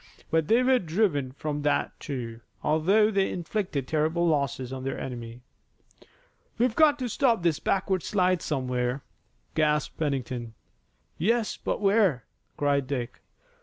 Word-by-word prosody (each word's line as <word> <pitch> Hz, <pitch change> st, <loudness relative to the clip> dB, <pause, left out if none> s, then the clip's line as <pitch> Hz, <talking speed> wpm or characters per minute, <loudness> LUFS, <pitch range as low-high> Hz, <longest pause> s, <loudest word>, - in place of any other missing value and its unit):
But 160 Hz, -2 st, +2 dB
they 235 Hz, +3 st, +4 dB
were 255 Hz, 0 st, +4 dB
driven 160 Hz, -6 st, 0 dB
from 150 Hz, +1 st, -3 dB
that, 145 Hz, 0 st, +1 dB
too, 120 Hz, -5 st, -5 dB, 0.2 s
although 195 Hz, +8 st, +3 dB
they 195 Hz, -2 st, +2 dB
inflicted 175 Hz, -, -3 dB
terrible 160 Hz, +2 st, +1 dB
losses 140 Hz, -4 st, 0 dB
on 130 Hz, -1 st, -5 dB
their 135 Hz, -, -3 dB
enemy. 120 Hz, -1 st, -7 dB, 1.2 s
"We've 240 Hz, 0 st, +2 dB
got 305 Hz, -2 st, +5 dB
to 255 Hz, -3 st, -3 dB
stop 235 Hz, -4 st, +2 dB
this 170 Hz, -3 st, +2 dB
backward 190 Hz, -1 st, 0 dB
slide 185 Hz, -2 st, +1 dB
somewhere," 125 Hz, -2 st, -1 dB, 0.5 s
gasped 150 Hz, -1 st, +1 dB
Pennington. 125 Hz, -6 st, -2 dB, 0.6 s
"Yes, 225 Hz, +5 st, +1 dB
but -, -, -3 dB
where?" 195 Hz, -, +3 dB, 0.3 s
cried 140 Hz, -2 st, +1 dB
Dick. 125 Hz, -3 st, -4 dB
155 Hz, 130 wpm, -27 LUFS, 130-195 Hz, 1.2 s, got